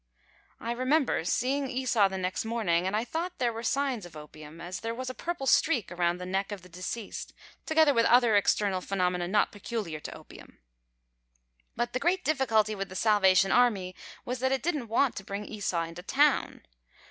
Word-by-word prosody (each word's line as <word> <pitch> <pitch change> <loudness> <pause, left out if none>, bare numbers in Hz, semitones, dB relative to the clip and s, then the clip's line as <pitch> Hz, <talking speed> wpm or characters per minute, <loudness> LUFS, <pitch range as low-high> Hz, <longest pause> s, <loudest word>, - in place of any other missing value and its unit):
I 230 - -4
remember 255 - +1
seeing 265 +9 0
Esau 245 -5 +2
the 190 - -4
next 185 0 -2
morning 200 -7 0
and 195 - -1
I 220 - +1
thought 340 +7 -4
there 240 -2 0
were 225 - -5
signs 265 -2 -1
of 175 -2 -11
ropium, 150 +1 -11
as 175 +2 -6
there 230 0 -4
was 255 +1 -4
a - - -10
purple 335 -1 -4
streak 255 - +2
around 175 0 0
the 180 - -7
neck 195 +2 -2
of 200 -3 -6
deceased, 185 +5 -6 0.3
together 315 -2 +4
with 230 -2 +3
other 240 -3 +5
external 200 -2 +2
phenomena 180 -2 -1
not 210 +3 +2
peculiar 205 -6 -5
to - - -8
opium. - - -15 1.2
But 240 +1 -2
the 255 - 0
great 365 +4 0
difficulty 225 -8 +2
with 195 -1 -4
the 185 - -9
Salvation 195 -3 +4
Army 205 -7 +2 0.3
was 250 +1 -3
that 260 +1 +1
it 270 -1 0
didn't 300 -8 -1
want 235 +3 +2
to 195 - -5
bring 200 +2 -5
Esau 190 -6 -2
into 165 +1 -8
town. 285 +9 +1
220 Hz, 185 wpm, -28 LUFS, 185-255 Hz, 1.2 s, other